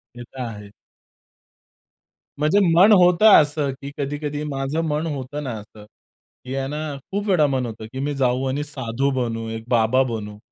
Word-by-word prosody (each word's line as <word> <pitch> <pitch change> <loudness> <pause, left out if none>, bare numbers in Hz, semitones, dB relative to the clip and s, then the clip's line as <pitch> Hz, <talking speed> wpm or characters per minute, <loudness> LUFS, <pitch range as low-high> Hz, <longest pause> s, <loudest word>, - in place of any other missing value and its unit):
ते 120 - -8
तर 130 - -12
आहे. 105 -4 -7 1.7
म्हणजे 155 +7 +2 0.2
मन 195 +5 +7
होत 180 -1 +5
असं, 150 -8 +5
की 140 - -7
कधी-कधी 145 +1 -3
माझं 135 +2 -2
मन 150 +2 -1
होतं 145 0 -5
ना 130 - -4
असं, 105 0 -15 0.6
की 130 +1 -6
आहे 135 0 -2
ना 150 +2 -4 0.3
खूप 200 +1 -2
वेळा 165 -6 +4
मन 130 -2 -1
होतं, 110 -1 -8
की 130 - -6
मी 145 +1 -2
जाऊ 130 -1 +1
आणि 140 +3 -2
साधू 135 -2 -2
बनू, 115 -3 -2
एक 115 0 -6
बाबा 120 +2 +3
बनू. 105 -2 -6
135 Hz, 170 wpm, -22 LUFS, 120-150 Hz, 1.7 s, मन